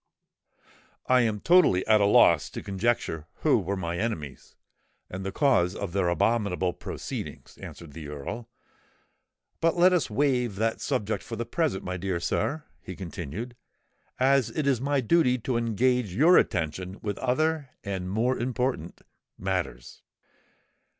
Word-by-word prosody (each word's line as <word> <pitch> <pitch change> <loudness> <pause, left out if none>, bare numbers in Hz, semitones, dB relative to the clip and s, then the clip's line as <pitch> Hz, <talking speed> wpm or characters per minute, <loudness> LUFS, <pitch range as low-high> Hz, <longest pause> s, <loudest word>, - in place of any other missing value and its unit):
"I 130 0 +4
am 110 -3 0
totally 170 - +4
at 110 -1 +4
a 100 - +4
loss - - +5
to - - -7
conjecture 95 -6 -1
who - - +4
were 100 +2 -3
my 85 -1 -3
enemies, 80 - -4 0.6
and 95 +1 -5
the 95 - -3
cause 95 -8 +2
of 100 -4 -5
their 95 -3 +1
abominable 95 0 +1
proceedings," 90 - -7
answered 80 -4 -10
the 80 -1 -8
Earl. 75 - -6 1.1
"But 165 +1 +1
let 180 +1 +6
us 175 -7 +1
waive 125 -2 +1
that 110 +2 -1
subject 110 -6 -1
for 115 - -6
the 120 +1 -3
present, 135 - -1
my 90 0 -4
dear 90 -1 -2
sir," 150 - -1 0.2
he 95 - -8
continued; 95 - -6 0.6
"as 135 -1 +3
it 155 - -2
is 135 -4 +2
my 140 0 +1
duty 125 0 +3
to 125 +1 -3
engage 115 -2 +1
your 165 - +6
attention 90 +2 0
with 105 -2 -3
other 150 +3 0
and 95 -2 -4
more 120 +6 0
important 125 -8 -2 0.4
matters." - - -4
110 Hz, 145 wpm, -27 LUFS, 90-130 Hz, 1.1 s, let